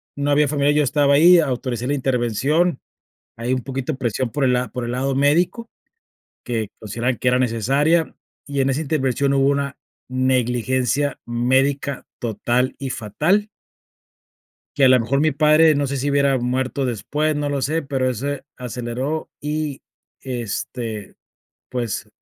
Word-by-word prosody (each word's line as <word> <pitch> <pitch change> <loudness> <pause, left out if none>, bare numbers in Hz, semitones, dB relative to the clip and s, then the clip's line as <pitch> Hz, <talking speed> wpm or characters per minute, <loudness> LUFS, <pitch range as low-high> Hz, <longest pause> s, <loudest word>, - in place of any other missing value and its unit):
no 145 0 -1
había 145 +1 +4
familiares, 145 0 +2
yo 150 - +4
estaba 140 +1 +3
ahí, 175 +4 +7
autoricé 125 -5 -2
la 140 - 0
intervención, 135 - +1 0.6
ahí 120 +2 -2
un 130 -1 0
poquito 135 +2 -3
presión 125 -1 -2
por 145 +3 -1
el 130 - +3
la 125 0 0
por 125 +2 -5
el 120 - -3
lado 135 +2 -1
médico, 170 - +2 0.8
que 115 -3 -2
consideraban 120 +4 -2
que 125 - +1
era 125 0 +3
necesaria, 135 +8 +1 0.3
y 140 -1 -1
en 135 - +1
esa 135 +3 -1
intervención 140 -2 0
hubo 135 0 +3
una 140 -1 -1 0.3
negligencia 130 +2 0
médica 135 +4 0
total 120 +3 0
y 135 -1 -4
fatal 155 - 0 1.3
que 140 - +4
a - - +7
la 130 - +6
mejor 125 +4 0
mi 155 - +3
padre, 155 +2 +5
no 145 0 0
sé 140 +1 -3
si 140 +2 -1
hubiera 140 -1 +3
muerto 130 +2 -1
después, 145 +6 -1
no 145 0 -1
lo 140 -1 -2
sé, 160 +4 0
pero 135 -3 -1
ese 135 +3 -4
aceleró 125 +5 -4
y, 150 -1 -3 0.4
este, 115 -3 -5 0.6
pues, 120 -5 -3
135 Hz, 155 wpm, -21 LUFS, 125-145 Hz, 1.3 s, ahí